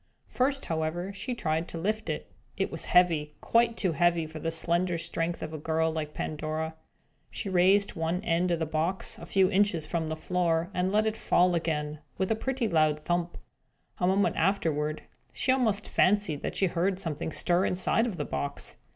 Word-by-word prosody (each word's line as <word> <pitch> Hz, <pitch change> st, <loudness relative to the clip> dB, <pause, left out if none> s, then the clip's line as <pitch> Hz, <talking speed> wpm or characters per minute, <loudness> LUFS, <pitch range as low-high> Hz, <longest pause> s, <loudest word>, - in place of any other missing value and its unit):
First, 275 Hz, +2 st, 0 dB
however, 165 Hz, +4 st, -2 dB
she 240 Hz, +6 st, -4 dB
tried 160 Hz, -5 st, -1 dB
to -, -, -7 dB
lift 215 Hz, +6 st, -2 dB
it. -, -, -4 dB, 0.3 s
It -, -, -1 dB
was -, -, -2 dB
heavy; 165 Hz, -4 st, +3 dB
quite 230 Hz, 0 st, +2 dB
too 185 Hz, -5 st, +1 dB
heavy 170 Hz, +1 st, +2 dB
for 155 Hz, 0 st, -8 dB
the 165 Hz, -, -2 dB
slender 170 Hz, +2 st, +1 dB
strength 165 Hz, 0 st, -3 dB
of 155 Hz, -, -6 dB
a 155 Hz, -, -5 dB
child 160 Hz, +1 st, 0 dB
like 155 Hz, -1 st, -4 dB
Pandora. 155 Hz, +1 st, -3 dB, 0.6 s
She 200 Hz, -, -5 dB
raised 190 Hz, +3 st, +4 dB
one 165 Hz, +2 st, -1 dB
end 175 Hz, -2 st, +1 dB
of 170 Hz, -, +2 dB
the 160 Hz, -, -1 dB
box 160 Hz, +5 st, -2 dB
a -, -, -9 dB
few 190 Hz, 0 st, +3 dB
inches 195 Hz, -5 st, +2 dB
from 160 Hz, 0 st, -2 dB
the 160 Hz, -, -2 dB
floor, 170 Hz, +1 st, 0 dB
and 180 Hz, +1 st, 0 dB
let 215 Hz, +1 st, +3 dB
it 220 Hz, 0 st, 0 dB
fall 180 Hz, -3 st, +3 dB
again, 150 Hz, -3 st, -2 dB, 0.2 s
with 190 Hz, +2 st, 0 dB
a -, -, +3 dB
pretty 260 Hz, +1 st, -1 dB
loud 155 Hz, -4 st, +3 dB
thump. 175 Hz, +1 st, -1 dB, 0.6 s
A 180 Hz, -, +2 dB
moment 195 Hz, +2 st, +2 dB
afterward, 155 Hz, -4 st, 0 dB, 0.3 s
she 255 Hz, -, +1 dB
almost 220 Hz, -6 st, +1 dB
fancied 185 Hz, -6 st, +2 dB
that -, -, -4 dB
she 195 Hz, -, +3 dB
heard 185 Hz, +2 st, 0 dB
something 160 Hz, -3 st, -3 dB
stir 175 Hz, +3 st, +2 dB
inside 190 Hz, +6 st, +2 dB
of 200 Hz, -7 st, -4 dB
the 145 Hz, -, -2 dB
box. 140 Hz, 0 st, -5 dB
175 Hz, 190 wpm, -28 LUFS, 160-195 Hz, 0.6 s, raised